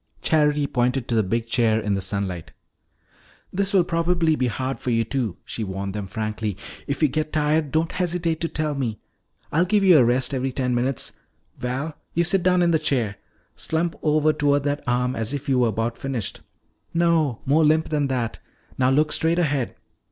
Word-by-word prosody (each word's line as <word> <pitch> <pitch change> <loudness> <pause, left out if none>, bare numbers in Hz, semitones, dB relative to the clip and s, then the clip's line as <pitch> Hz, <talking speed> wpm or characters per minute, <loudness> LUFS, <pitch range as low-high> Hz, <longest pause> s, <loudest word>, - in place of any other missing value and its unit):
Charity 150 -2 +3
pointed 125 -1 0
to - - 0
the 110 - +4
big 115 +4 -1
chair 115 -2 +2
in 105 -2 -1
the 95 - -1
sunlight. 95 -3 -3 1.0
"This 195 +1 0
will 190 -3 +4
probably 170 -1 +1
be 130 -3 0
hard 130 +4 -3
for - - -3
you 115 -1 +2
two," 120 -7 -2
she 115 - -4
warned 95 0 -4
them 105 -2 -4
frankly. 110 -1 -3 0.3
"If 140 +3 -2
you - - +7
get 155 +2 -2
tired, 150 -1 +1
don't 160 +1 +1
hesitate 170 -2 -1
to 165 - +1
tell 155 -2 -2
me. 125 -6 -2 0.5
I'll 165 +4 +3
give 200 +3 +2
you 180 -5 +7
a - - +6
rest 125 +3 +1
every 130 0 -1
ten 125 -1 0
minutes. 125 +1 0 0.5
Val, 135 +6 -3 0.2
you 170 - +3
sit 180 +3 +2
down 180 0 +3
in 170 - +3
the 160 - +3
chair. 120 -10 0 0.4
Slump 165 +1 -1
over 155 0 +3
toward 145 -1 +2
that 145 0 -1
arm 125 +1 +1
as 115 +4 -1
if 145 0 -6
you 130 -2 +2
were 120 - +4
about 115 +2 -2
finished. 130 -6 -3 0.5
No, 165 -7 +2
more 150 +4 +4
limp 155 +1 +3
than 150 -2 +1
that. 125 -4 -2 0.4
Now 130 0 +4
look 150 +3 +2
straight 165 +1 +1
ahead. 145 -7 0
140 Hz, 195 wpm, -23 LUFS, 120-160 Hz, 1.0 s, you